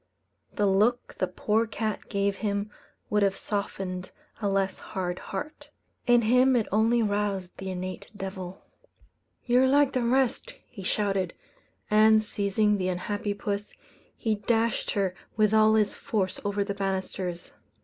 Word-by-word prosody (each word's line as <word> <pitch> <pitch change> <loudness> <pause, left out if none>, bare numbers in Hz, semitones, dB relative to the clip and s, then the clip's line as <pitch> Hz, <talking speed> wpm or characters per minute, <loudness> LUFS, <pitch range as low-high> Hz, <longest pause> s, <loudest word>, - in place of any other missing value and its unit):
The 210 - +1
look 210 +5 +2
the 185 - +1
poor 215 +5 0
cat 215 0 -3
gave 200 -1 0
him 205 0 -2 0.4
would 210 0 +3
have 195 -1 +2
softened 190 -3 -3 0.3
a 205 - +1
less 195 -1 0
hard 180 -2 -4
heart; 290 +7 -6 0.4
in 240 -1 +5
him 250 +3 +4
it 230 -3 +2
only 225 +3 +3
roused 205 -3 -1
the 190 0 -4
innate 185 0 -5
devil. 190 -1 -6 0.8
"You're 250 +1 +4
like 280 +1 +4
the 255 - +1
rest," 250 +1 +1
he 215 - -11
shouted; 195 -2 0 0.6
and, 215 0 +6
seizing 205 0 +1
the 185 - 0
unhappy 205 +3 -2
puss, 205 0 -4 0.4
he 220 - 0
dashed 225 +2 0
her 195 -3 0 0.2
with 215 -1 +3
all 220 0 +6
his 210 -2 +2
force 210 -8 -2
over 205 0 0
the 200 0 -3
banisters. 190 -2 -3
205 Hz, 145 wpm, -27 LUFS, 195-220 Hz, 0.8 s, and